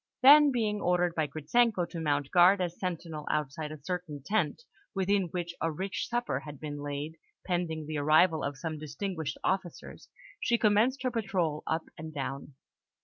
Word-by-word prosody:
Then, 290 +2 +9
being 215 -4 0
ordered 180 -1 +2
by 155 -3 0
Gritzenko 180 +6 +1
to 170 - -5
mount 145 -3 0
guard 180 +3 +6
as 175 -2 -3
sentinel 165 -4 -4
outside 150 +1 -2
a 155 - -7
certain 155 -2 -5
tent, 220 - 0 0.3
within 195 0 +2
which 170 0 -4
a 165 - +1
rich 190 +5 -3
supper 240 0 -1
had 150 -3 -10
been 145 -1 -6
laid, 145 +2 -5 0.3
pending 170 -4 -2
the 155 0 -3
arrival 155 +3 +4
of 140 -1 -3
some 155 +1 -4
distinguished 160 +1 -4
officers, 190 -3 -3 0.3
she 235 - +2
commenced 230 +5 +3
her 255 - 0
patrol 190 -9 -1
up 160 0 0 0.2
and 155 -1 -8
down. 135 0 -5
170 Hz, 165 wpm, -30 LUFS, 150-195 Hz, 0.3 s, Then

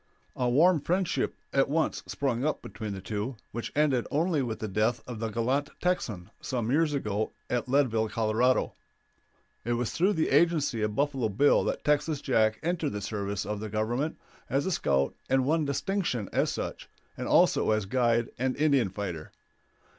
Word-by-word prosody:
A 125 -1 0
warm 160 +5 +4
friendship 180 +3 0 0.2
at 135 0 +3
once 160 +2 0
sprung 130 -4 -1
up 155 +1 -1
between 110 -2 -6
the 95 - -6
two, 105 +6 -3 0.2
which 115 - -5
ended 140 -5 +2
only 160 0 +1
with 115 -4 -3
the 110 - -4
death 110 +4 0
of 120 -3 -7
the 115 0 -2
gallant 130 +6 0
Texan 110 - -2
some 120 -3 -2
years 150 0 +2
ago 110 -5 -2 0.2
at 125 0 -1
Leadville, 120 -5 +2
Colo. 115 +4 +1 0.9
It 120 - 0
was 120 -1 -1
through 190 +5 +2
the 160 - 0
agency 145 -5 +3
of 105 -1 -1
Buffalo 135 -4 0
Bill 125 +9 +4
that - - -2
Texas 150 0 +1
Jack 110 -6 +2
entered 165 -5 -1
the 105 - -3
service 100 -1 -3
of 105 0 -3
the 110 0 -5
Government 120 +8 -1 0.3
as 140 +1 +1
a 190 - 0
scout 70 - +1 0.2
and 130 0 +3
won 155 +2 +2
distinction 140 - -1
as - - +2
such, - - -5 0.3
and - - -4
also - - +4
as 110 -2 +2
guide 120 +1 +1
and 130 0 0
Indian 140 -8 +3
fighter. 90 -5 -5
125 Hz, 175 wpm, -28 LUFS, 110-145 Hz, 0.9 s, warm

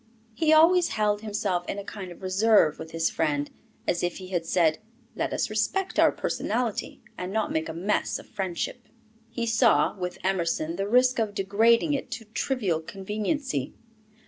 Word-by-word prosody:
He 310 +7 +2
always 335 +3 +6
held 210 -1 0
himself 205 -4 -1
in - - -3
a 200 - -5
kind 195 -2 -8
of 175 - -13
reserve 190 -4 +3
with 160 - -7
his 165 0 0
friend, 145 -2 -1 0.4
as 175 - +1
if 175 0 -1
he 185 -1 -9
had 175 -3 -2
said, 165 -3 +2 0.4
"Let - - -2
us - - 0
respect 385 -1 -1
our - - +6
personality, 230 -1 -2 0.2
and 180 +1 -4
not 220 0 -1
make 160 +1 -1
a - - -4
'mess' 190 +6 0
of - - -12
friendship." 195 +4 -4 0.4
He 235 - -3
saw, 230 0 +3
with 180 -2 -4
Emerson, 170 -3 0
the 195 0 -1
risk 250 +1 +4
of 210 -2 -1
degrading 225 - +3
it 280 - -3
to 225 - -7
trivial 215 - -1
conveniency. 205 - -3
200 Hz, 170 wpm, -26 LUFS, 175-230 Hz, 0.4 s, always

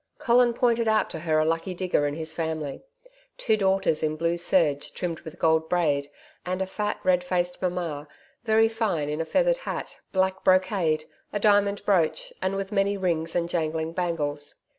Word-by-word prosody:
Colin 240 0 +3
pointed 235 -2 +2
out 220 0 +2
to 160 - -5
her 155 -1 +1
a 155 - +3
lucky 165 +3 -1
digger 175 -5 +1
and 145 +1 -4
his 160 0 -4
family 160 -3 -3 0.6
two 220 - +2
daughters 195 -5 +1
in 155 -1 0
blue 165 +2 0
serge 165 -4 +2
trimmed 170 -3 -3
with 160 +2 -10
gold 160 -1 +2
braid, 145 -5 +1 0.3
and 180 +1 -3
a 190 - 0
fat 210 +2 -3
red 180 -1 +3
faced 180 0 -1
Mamma, 170 -5 -3 0.4
very 225 -1 +4
fine 210 -10 -1
in 150 +2 -2
a - - -2
feathered - - +2
hat, - - -6
black 190 0 0
brocade, 185 -4 +2 0.3
a 205 - -2
diamond 205 -1 +3
brooch, 180 -6 +1
and 190 +1 0
with 195 0 -4
many 200 0 +1
rings 165 -3 -1
and 170 -1 +1
jangling 160 -1 -2
bangles. 150 -5 -2
175 Hz, 180 wpm, -26 LUFS, 160-195 Hz, 0.6 s, very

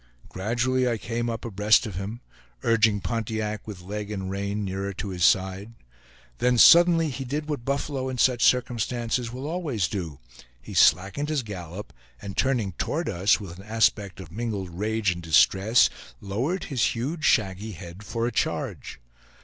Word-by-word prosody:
Gradually 120 +6 0
I 115 - -1
came 115 +3 -3
up 115 0 -5
abreast 105 0 +3
of 105 - -5
him, 100 +6 -5 0.4
urging 110 -3 +3
Pontiac 110 -2 -3
with 95 -4 -8
leg 105 +2 -5
and 95 -3 -4
rein 100 +1 -3
nearer 95 +1 -3
to 100 +1 -5
his 90 -2 -3
side, 95 +5 +2 0.7
then 125 0 +2
suddenly 165 +2 +7
he 135 +1 -5
did 145 +4 -4
what 145 -6 -3
buffalo 140 -1 -2
in 130 - -4
such 125 -1 +3
circumstances 120 -1 +1
will 130 +3 -6
always 150 - -1
do; 85 -9 -5 0.4
he - - -11
slackened 100 - +3
his 150 -4 0
gallop, 95 -2 -8 0.3
and 100 -1 -7
turning 120 -7 +1
toward - - -3
us, 95 +6 +2
with 95 -5 -8
an - - -10
aspect 105 -2 +1
of 85 -4 -10
mingled 105 -3 -4
rage 105 +2 0
and 85 -1 -5
distress, 95 +8 +4 0.3
lowered 125 - -2
his 125 -7 0
huge 150 +8 -3
shaggy 105 -4 +1
head 85 +3 -10
for 115 +2 -2
a 120 - -1
charge. 105 - -3
110 Hz, 165 wpm, -25 LUFS, 95-125 Hz, 0.7 s, suddenly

